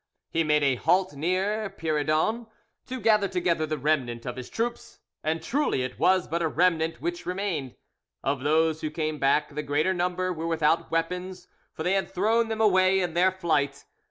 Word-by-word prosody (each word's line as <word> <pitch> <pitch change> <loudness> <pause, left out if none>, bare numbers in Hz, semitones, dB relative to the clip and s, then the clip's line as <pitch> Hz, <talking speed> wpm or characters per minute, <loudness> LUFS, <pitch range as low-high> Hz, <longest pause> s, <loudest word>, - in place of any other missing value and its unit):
He 165 - +1
made 150 -1 +2
a 135 -3 +2
halt 185 +4 +2
near 190 +8 -1
Pierredon 160 +9 0 0.4
to 260 0 -5
gather 210 -2 +3
together 175 -4 0
the 155 0 -2
remnant 130 -5 -1
of 125 - -4
his 130 -1 -8
troops, 235 +1 -4 0.3
and 160 +1 -1
truly 280 - 0
it 130 0 -6
was 185 -1 +3
but 170 +2 -2
a 165 - +2
remnant 165 0 +1
which 345 0 -4
remained. 180 -9 -3 0.5
Of 140 0 0
those 155 +3 +2
who 155 - -2
came 155 -1 -3
back 145 +2 +2
the 150 - -2
greater 150 +6 +1
number 180 +1 -1
were 165 0 -4
without 160 0 +1
weapons, 180 +2 -3 0.2
for 160 - -6
they 180 - +1
had 195 0 0
thrown 220 +5 +1
them 220 0 -2
away 190 -2 +4
in 175 -3 -1
their 180 +2 +3
flight. 155 -7 -1
170 Hz, 185 wpm, -26 LUFS, 155-190 Hz, 0.5 s, away